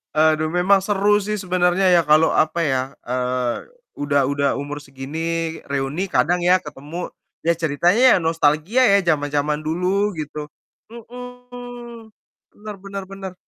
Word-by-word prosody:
Aduh 155 Hz, 0 st, +3 dB
memang 185 Hz, +3 st, +4 dB
seru 205 Hz, +1 st, +2 dB
sih 210 Hz, -1 st, -2 dB
sebenarnya 180 Hz, 0 st, +1 dB
ya 175 Hz, -1 st, +5 dB
kalau, 155 Hz, +2 st, +5 dB
apa 160 Hz, +2 st, +1 dB
ya, 135 Hz, -3 st, -1 dB
eee, 125 Hz, 0 st, -2 dB, 0.3 s
udah 140 Hz, -2 st, +1 dB
udah 140 Hz, 0 st, 0 dB
umur 145 Hz, +1 st, -6 dB
segini 135 Hz, +1 st, -8 dB, 0.5 s
reuni 140 Hz, +6 st, -2 dB
kadang 175 Hz, -2 st, +1 dB
ya 180 Hz, 0 st, +4 dB
ketemu, 150 Hz, +4 st, -7 dB, 0.3 s
ya 170 Hz, +1 st, +2 dB
ceritanya 175 Hz, -, +3 dB
nostalgia 165 Hz, -, +2 dB
ya -, -, +6 dB
jaman-jaman 145 Hz, 0 st, 0 dB
dulu 185 Hz, +5 st, 0 dB
gitu. 150 Hz, -2 st, -6 dB, 0.5 s
Mhm, 245 Hz, -1 st, -10 dB, 0.4 s
Bener 210 Hz, 0 st, -9 dB
bener 195 Hz, 0 st, -6 dB
bener. 195 Hz, -1 st, -7 dB
170 Hz, 130 wpm, -21 LUFS, 145-200 Hz, 0.5 s, ya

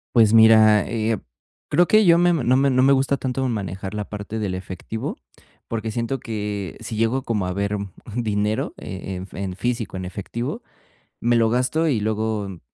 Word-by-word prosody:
Pues, 110 Hz, -3 st, +6 dB
mira, 110 Hz, -2 st, +6 dB
eh, 110 Hz, -1 st, 0 dB, 0.5 s
creo 175 Hz, 0 st, +4 dB
que 215 Hz, -1 st, +5 dB
yo 170 Hz, -1 st, +6 dB
me 175 Hz, 0 st, +4 dB
no 130 Hz, -5 st, +2 dB
me 140 Hz, +1 st, +3 dB
no 130 Hz, -1 st, +3 dB
me 140 Hz, +1 st, +6 dB
gusta 135 Hz, +1 st, +2 dB
tanto 130 Hz, 0 st, -2 dB
manejar 95 Hz, -2 st, -4 dB
la 105 Hz, -1 st, -4 dB
parte 105 Hz, +1 st, -6 dB
del 100 Hz, -4 st, -2 dB
efectivo, 95 Hz, +4 st, -5 dB, 0.5 s
porque 115 Hz, -1 st, -3 dB
siento 120 Hz, +4 st, -2 dB
que 105 Hz, -5 st, -4 dB
si 110 Hz, -, -5 dB
llego 115 Hz, +4 st, +1 dB
como 105 Hz, -5 st, -1 dB
a 90 Hz, -, -2 dB
ver 100 Hz, +1 st, -1 dB
un 100 Hz, -2 st, -6 dB
un 115 Hz, +2 st, -3 dB
dinero, 105 Hz, -1 st, -1 dB
eh 95 Hz, -, -7 dB
eh, 95 Hz, -, -4 dB
en 90 Hz, +1 st, -6 dB
en 95 Hz, -2 st, -4 dB
físico, 115 Hz, -2 st, -2 dB
en 95 Hz, -, -5 dB
efectivo, 105 Hz, +6 st, -5 dB, 0.6 s
me 120 Hz, 0 st, +3 dB
lo 115 Hz, -1 st, +3 dB
gasto 130 Hz, +7 st, +1 dB
y 120 Hz, -8 st, +1 dB
luego 105 Hz, -3 st, -2 dB
110 Hz, 195 wpm, -22 LUFS, 100-125 Hz, 0.6 s, Pues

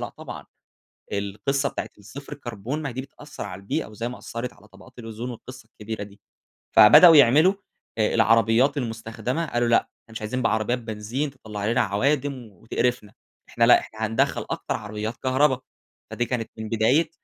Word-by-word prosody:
لأ -, -, -3 dB
طبعًا. -, -, -10 dB, 0.7 s
القصة 105 Hz, +8 st, -1 dB
بتاعة -, -, -5 dB
الصفر 130 Hz, +9 st, -10 dB
كربون، 125 Hz, +1 st, -5 dB
ما 140 Hz, -4 st, -4 dB
دي 130 Hz, -, -4 dB
بتأثّر 145 Hz, +2 st, -10 dB
على 95 Hz, -2 st, -7 dB
البيئة، 100 Hz, -, -2 dB
وزي 115 Hz, +3 st, -5 dB
ما 125 Hz, -, -8 dB
أثّرت 120 Hz, +2 st, -6 dB
على 105 Hz, +1 st, -20 dB
طبقات 100 Hz, +6 st, -17 dB
الأوزون، 115 Hz, +2 st, -6 dB
والقصة 130 Hz, +2 st, -10 dB
الكبيرة 110 Hz, 0 st, -7 dB
دي. 100 Hz, 0 st, -14 dB, 0.6 s
فبدأوا 165 Hz, +10 st, +9 dB
يعملوا 150 Hz, +8 st, +6 dB, 0.4 s
آآ 110 Hz, -, +1 dB
العربيات 115 Hz, +5 st, +4 dB
المُستخدمة، 120 Hz, +4 st, -3 dB
قالوا: 120 Hz, -3 st, 0 dB
"لأ، 115 Hz, -, +5 dB
إحنا 115 Hz, -, -11 dB
مش 110 Hz, -, -6 dB
عايزين 120 Hz, +4 st, -3 dB
بعربيات 115 Hz, +2 st, +1 dB
بنزين 115 Hz, +5 st, -4 dB
تطلّع 105 Hz, -6 st, -6 dB
لنا 120 Hz, +2 st, +2 dB
عَوادم 135 Hz, +7 st, +1 dB, 0.2 s
وتقرفنا. 115 Hz, +2 st, -2 dB, 0.4 s
إحنا 115 Hz, -, +1 dB
لأ، 120 Hz, -, +7 dB
إحنا 110 Hz, 0 st, -5 dB
هندخّل 115 Hz, +1 st, 0 dB
أكتر -, -, -3 dB
عربيات 105 Hz, +2 st, -5 dB
كهربا." 130 Hz, 0 st, +2 dB, 0.5 s
فدي 120 Hz, -, -1 dB
كانت 120 Hz, -3 st, -3 dB
من 110 Hz, -1 st, -5 dB
بداية 115 Hz, +9 st, +2 dB
115 Hz, 165 wpm, -24 LUFS, 110-130 Hz, 0.7 s, فبدأوا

